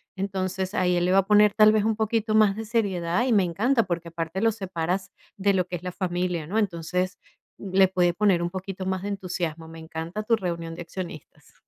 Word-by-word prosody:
Entonces 190 0 -3
ahí 180 -3 +2
él 175 - +1
le 180 - +2
va 195 - +4
a 190 - +1
poner, 210 -1 +5
tal 215 0 +6
vez, 215 -1 +2
un 220 0 0
poquito 220 0 0
más 210 -2 +5
de 225 - -4
seriedad, 200 -2 0
y 245 - +2
me 200 -3 +4
encanta, 225 +8 +1
porque 170 -1 -3
aparte 165 +2 -4
los 225 0 +2
separas 190 -1 -3 0.2
de 200 0 +2
lo 180 -2 +1
que 180 - -4
es 175 - -7
la 180 - -4
familia, 175 -3 -2
¿no? 210 +5 -2
Entonces, 180 -1 -2 0.4
le 190 -1 +3
puede 175 -2 +2
poner 195 -3 +2
un 170 - -1
poquito 190 0 -6
más 190 -1 -1
de 205 - -3
entusiasmo. 175 -4 -4
Me 165 0 -10
encanta 165 +5 -5
tu 230 +1 +3
reunión 170 -3 -4
de 175 - -7
accionistas. 175 -2 -9
185 Hz, 220 wpm, -25 LUFS, 175-205 Hz, 0.4 s, tal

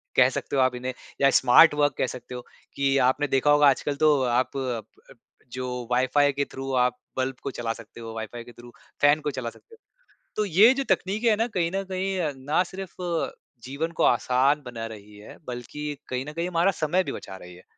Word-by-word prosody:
कह - - +6
सकते - - -4
हो 135 - +3
आप 130 -1 +2
इन्हें 125 +1 -4 0.3
या 140 - +6
स्मार्ट 130 +5 +7
वर्क 145 0 +3
कह - - +1
सकते 125 0 -9
हो 125 - -6 0.3
कि 140 0 +2
आपने 145 +3 +1
देखा 135 +2 +3
होगा 145 0 +5
आजकल 140 +1 -1
तो 155 - +6 0.3
आप 130 - 0
प - - -2 0.2
अप 125 +3 -15 0.3
जो 130 0 -4 0.2
वाइफाई 130 +3 +3
के 140 +1 0
थ्रू 135 0 -5
आप 125 0 -1 0.2
बल्ब 130 0 -1
को 140 - -3
चला 120 -2 -3
सकते 115 +1 -13
हो 115 -1 -7
वाइफाई 115 +2 -6
के 120 - -13
थ्रू 120 0 -14 0.3
फैन 145 +1 +5
को 150 - -2
चला 120 -2 -3
सकते 455 - -18
हो। - - -25 0.6
तो 215 - 0
ये 205 +7 +6
जो 275 - -2
तकनीकें 215 +5 +1
है 215 - +4
ना 225 +3 0
कहीं 180 -6 -1
न 195 - -1
कहीं 190 +1 -2
अ, 160 -4 0
ना 145 +7 0
सिर्फ 185 0 -8 0.7
जीवन 140 +6 -4
को - - +3
आसान 130 +4 +3
बना 115 -2 -6
रही 105 0 -15
है 105 - -12
बल्कि 125 +4 -6 0.2
कहीं 130 +1 -3
न - - -9
कहीं 170 +2 -2
हमारा 180 +2 +2
समय 170 +4 +1
भी - - -5
बचा 95 - -8
रही 90 -1 -12
है। 90 - -16
135 Hz, 225 wpm, -25 LUFS, 125-165 Hz, 0.7 s, स्मार्ट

